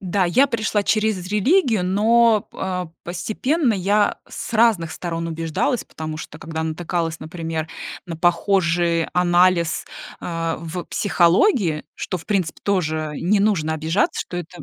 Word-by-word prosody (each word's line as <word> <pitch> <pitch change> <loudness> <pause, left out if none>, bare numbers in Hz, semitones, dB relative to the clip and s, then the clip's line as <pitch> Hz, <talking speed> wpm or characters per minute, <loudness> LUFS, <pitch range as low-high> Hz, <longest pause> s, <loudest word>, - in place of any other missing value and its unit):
Да, 190 0 0
я 250 +11 +4
пришла 220 -4 -1
через 215 -5 +1
религию, 220 - +2
но 220 +3 +3
п - - -16
а, 180 -2 -2
постепенно 235 - 0
я, 200 +2 +1
э, - - -26
с - - -6
разных 215 -8 +3
сторон 165 -1 -4
убеждалась, 165 - -1
потому 155 -1 -6
что 155 -1 -9
когда 160 0 -4
натыкалась, 165 0 -2
например, 160 0 -4 0.4
на 165 - -5
похожий 170 -1 +2
анализ, 175 -1 +3 0.4
а, 165 -1 -2
в 170 +2 -5
психологии, 175 - +2
что, 185 - -3
в 175 - -11
принципе, 190 -6 -1
тоже, 160 -6 0
э, - - -5
не 200 +4 +2
нужно 165 -7 +1
обижаться, 160 +6 0
что 175 - -6
это, 175 0 -7
180 Hz, 150 wpm, -21 LUFS, 165-205 Hz, 0.4 s, я